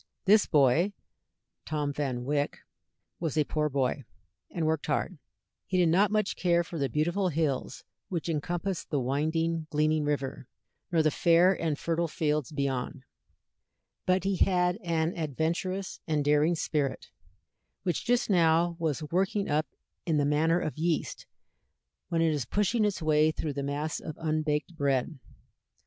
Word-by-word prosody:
This 210 +2 +5
boy, 155 +6 +3 0.7
Tom 150 -2 -1
Van 130 -4 -2
Wyck, 145 +1 -1 0.6
was 160 -3 -2
a 155 - +4
poor 150 +1 -1
boy, 140 0 -1 0.5
and 165 - -2
worked 160 -1 0
hard; 185 -6 -1 0.5
he 185 - 0
did 175 -2 +4
not 195 +5 +4
much 215 -1 0
care 175 -1 +2
for 165 -1 -7
the 135 -1 0
beautiful 175 - 0
hills 155 -4 -2 0.3
which 170 -3 -3
encompassed 175 +4 -2
the 145 - 0
winding, 160 +5 -1
gleaming 155 +1 +1
river, 140 -3 -2 0.4
nor 165 -2 +3
the 155 - +3
fair 175 +4 +4
and 160 -5 -2
fertile 170 +1 -1
fields 150 -3 -1
beyond, 140 -1 -2 1.0
but 185 0 +3
he 195 -1 0
had 180 -1 +2
an 165 0 0
adventurous 170 +5 -2
and 150 -3 0
daring 150 +3 +3
spirit, 150 -3 -2 0.7
which 175 - -1
just 245 +1 +1
now 170 -2 +3
was 160 -2 -1
working 195 +3 +1
up 150 +1 +1 0.4
in 160 -2 +2
the 145 - +2
manner 160 +4 +2
of 155 -2 -4
yeast 165 0 -1 0.8
when 165 -1 +1
it 160 -1 +2
is 145 -6 -2
pushing 210 - +1
its 200 -5 -1
way 155 0 +4
through 155 -1 -3
the 140 - -3
mass 145 +3 -2
of 155 - -7
unbaked 155 +1 -1
bread. 140 0 0
160 Hz, 150 wpm, -29 LUFS, 150-175 Hz, 1.0 s, This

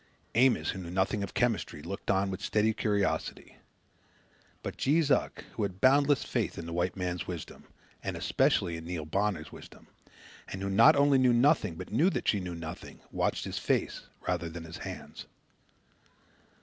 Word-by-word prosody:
Amos, 125 +3 +3
who 95 - -6
knew 85 -2 -7
nothing 95 +3 0
of 100 - -5
chemistry, 115 -11 0
looked 100 +4 -6
on 95 0 +2
with 95 - -5
steady 110 +1 +2
curiosity. 100 -3 -1 1.1
But - - -4
Jees 150 +1 +2
Uck, - - +1
who - - -4
had 95 -2 -2
boundless 140 +3 +4
faith - - -2
in 85 - -5
the 85 - -6
white 90 +2 0
man's 90 -2 -3
wisdom, 85 -4 -7 0.4
and - - -3
especially 85 -1 +1
in 80 - -9
Neil 85 -3 -4
Bonner's 95 -1 -1
wisdom, - - -13 0.6
and 95 0 -6
who 100 - -1
not 110 +4 +7
only 140 -1 +4
knew 125 -1 +4
nothing 120 - +3
but - - -8
knew 170 +6 +4
that - - -3
she 105 - +3
knew 90 -2 -5
nothing 80 -1 -8
watched - - -1
his - - -3
face - - -1 0.2
rather 85 -2 -1
than 85 0 -7
his 85 0 -8
hands. - - -8
95 Hz, 175 wpm, -30 LUFS, 85-120 Hz, 1.1 s, not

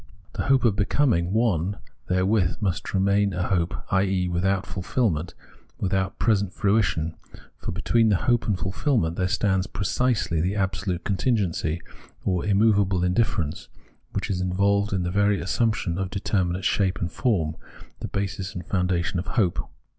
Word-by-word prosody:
The - - -3
hope 135 -2 +3
of 110 -4 +3
be 105 -2 +1
coming 100 -11 +2
one 100 -4 +1 0.3
therewith 95 -1 +2
must 95 -5 -2
remain 100 +1 +2
a 90 +1 -2
hope, 85 -3 0 0.2
i.e. 95 -1 +2
without 95 +2 0
fulfilment, 90 -2 -1 0.4
without 95 0 -1
present 100 -4 +1
fruition; 100 -6 +1 0.5
for - - -4
between 110 +4 +2
the 105 - +4
hope 120 +5 +1
and 105 -4 +1
fulfilment 95 - 0
there 90 0 0
stands 95 0 +1
precisely 100 -3 0
the 95 +4 0
absolute 95 -2 -1
contingency, 95 -6 0 0.4
or 90 -3 0
immovable 100 -3 +3
indifference, 90 -4 0 0.4
which - - -2
is 90 -1 -1
in 90 0 -1
volved 100 +1 +2
in 95 -2 0
the 90 - -2
very 100 +1 +2
assumption 110 -7 0
of 95 -1 -2
determinate 95 -2 -1
shape 95 -3 +1
and 85 - -2
form, 85 - 0 0.4
the - - -4
basis 100 0 -3
and 90 -2 -6
foundation 90 -1 0
of 90 - -4
the - - -6
hope. 100 -8 0
95 Hz, 155 wpm, -25 LUFS, 90-105 Hz, 0.5 s, the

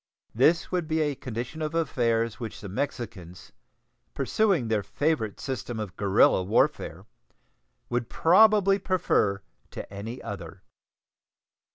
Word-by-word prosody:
This 155 +9 +3
would 180 -3 -1
be 160 0 0
a 150 -2 +1
condition 125 +4 -6
of 155 +1 -3
affairs 115 -8 0
which 115 -4 -6
the 100 - -8
Mexicans, 100 -5 -5 0.6
pursuing 195 - +1
their 110 -2 +1
favorite 110 +2 -1
system 120 -3 -4
of 100 -4 -5
guerrilla 100 -1 +4
warfare, 100 +5 0 0.8
would 120 -1 -2
probably 200 +2 +5
prefer 165 - +1 0.3
to - - -8
any 110 +5 -6
other. 100 -6 -8
120 Hz, 120 wpm, -27 LUFS, 105-160 Hz, 0.8 s, probably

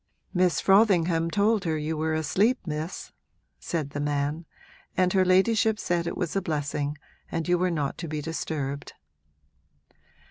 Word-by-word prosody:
'Miss 180 -2 +2
Frothingham 180 -5 +4
told 210 +2 +2
her 160 -2 0
you 155 +1 -2
were 155 +1 0
asleep, 195 - +2
Miss,' 155 +2 -5 0.5
said 155 -5 -3
the 145 - -4
man, 145 +2 -1 0.5
'and 180 -1 +3
her 190 -1 +4
ladyship 210 +4 +3
said 170 -4 -1
it - - -3
was 180 -2 -2
a 195 - +2
blessing 145 -3 -2 0.3
and 165 0 -2
you 180 - +4
were 185 0 +2
not 150 -5 -2
to 170 - -4
be 155 0 -3
disturbed.' 145 -3 -4
165 Hz, 150 wpm, -26 LUFS, 150-185 Hz, 0.5 s, Frothingham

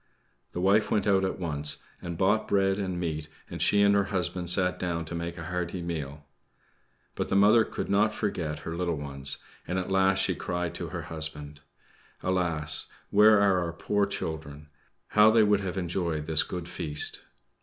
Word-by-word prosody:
The - - -3
wife 100 +3 +3
went 105 -2 +1
out 95 -2 +3
at 95 - -1
once 75 -4 0 0.2
and 85 -1 -5
bought 100 +4 +2
bread 95 0 +2
and 95 -3 -2
meat, 80 -3 -3 0.2
and - - -5
she 100 0 +4
and 100 0 +5
her 100 -1 +3
husband 90 -2 -2
sat 90 0 +1
down 85 -2 -2
to 80 - -7
make 85 0 -4
a - - -6
hearty 90 0 -3
meal. 75 -4 -5 0.9
But - - -3
the - - -1
mother 105 +3 +6
could - - -5
not 105 +2 +3
forget 80 -8 -3
her 85 - -4
little 85 -2 -1
ones; 70 -1 -3 0.3
and 90 - -2
at 95 +1 -3
last 95 0 +3
she 95 0 +2
cried 90 -1 -3
to - - -5
her - - -5
husband: 75 -2 -2 0.6
"Alas! 85 -5 -1 0.2
where 105 +1 +6
are 100 -2 +4
our 85 -2 -3
poor 100 +4 0
children? 75 -5 -5 0.4
How 105 +1 +6
they 110 0 +5
would 105 -1 +3
have 95 -1 -4
enjoyed 85 -4 -2
this 80 0 +3
good 90 -1 -5
feast!" 75 -4 -3
90 Hz, 185 wpm, -28 LUFS, 80-100 Hz, 0.9 s, mother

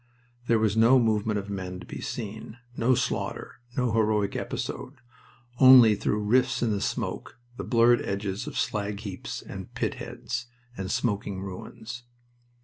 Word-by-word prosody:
There 115 - +4
was 110 -1 +1
no 115 +4 +6
movement 110 -3 +1
of 100 0 -4
men 90 -2 -5
to - - -10
be - - -7
seen, 110 0 -6 0.2
no 125 +3 +3
slaughter, - - -3 0.2
no 125 -2 +1
heroic 105 -2 +1
episode 135 - -4 0.6
only 130 -4 +9
through 105 +1 -1
rifts 120 +4 +2
in 115 - +1
the 100 -1 -1
smoke - - -3 0.2
the - - -5
blurred 120 0 +4
edges 100 0 -3
of - - -5
slag 105 -1 -2
heaps 100 -4 -6
and - - -8
pit - - -1
heads, 125 0 -5 0.3
and 95 -3 -5
smoking 100 -3 -1
ruins. 110 +5 -8
110 Hz, 150 wpm, -27 LUFS, 100-120 Hz, 0.6 s, only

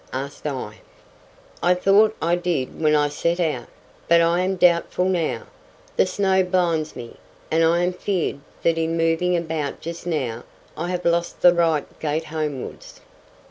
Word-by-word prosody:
asked 140 +3 -5
I. 130 -7 -5 0.8
"I 180 +1 +4
thought 205 +4 +4
I 170 +1 +3
did 170 -6 -2
when 155 -1 +4
I 145 0 +3
set 170 +4 -1
out, 160 -3 -1 0.4
but 170 0 +6
I 170 +1 +3
am 185 +1 0
doubtful 180 0 +3
now. 165 -10 0 0.5
The - - +3
snow 190 0 +2
blinds 175 -4 0
me, 120 -2 -9 0.3
and 165 +1 +3
I 170 +2 +3
am 180 +1 0
feared 180 -4 -2 0.2
that 165 -1 +2
in 165 +1 0
moving 165 +2 +2
about 160 -4 -3
just 170 +1 -7
now, 130 -9 -2 0.3
I 170 +2 -3
have 180 -1 -3
lost 170 0 0
the 175 - +7
right 165 -4 +2
gait 155 +1 -2
homewards." 155 -4 -5
170 Hz, 160 wpm, -22 LUFS, 155-180 Hz, 0.8 s, the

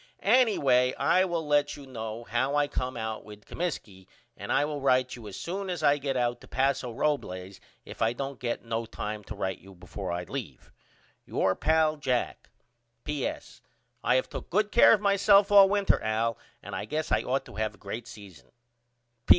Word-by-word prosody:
Anyway 135 - +4
I 185 +1 +3
will 170 -3 -2
let 145 0 +2
you 140 - -11
know 115 -3 -6
how 125 +5 -1
I 145 0 +3
come 130 -2 -3
out 110 -1 -4
with 105 -1 -13
Comiskey 105 - -5 0.3
and - - -6
I 145 - +3
will 150 -1 -4
write 130 -1 +2
you 115 -3 -10
as 100 - -8
soon 190 +3 -4
as 175 -3 -3
I 145 0 +4
get 135 -1 -2
out 120 -1 0
to - - -14
Paso 135 -2 0
Robles 95 -9 -2 0.3
if - - -10
I 110 0 +3
don't 135 +1 -5
get 120 -1 -3
no 115 0 -3
time 105 -1 -5
to 105 - -7
write 95 -2 -3
you 95 +1 -15
before 90 +1 -6
I 90 0 -2
leave. - - -7 0.5
Your 95 - +1
pal, 155 +5 +2
JACK. 130 -4 -2 0.5
P.S. 150 -3 -4 0.4
I 125 - +3
have 130 - +1
took - - -8
good 210 +3 +1
care 235 - +7
of 210 - +2
myself 200 0 +4
all 200 -1 +8
winter 200 0 +2
Al 110 +1 0 0.3
and - - -7
I - - -4
guess 155 +1 -3
I - - +3
ought 135 +1 -1
to - - -12
have 110 -1 -2
a - - -22
great 110 +4 -7
season. 95 -8 -13
130 Hz, 190 wpm, -28 LUFS, 110-155 Hz, 0.5 s, all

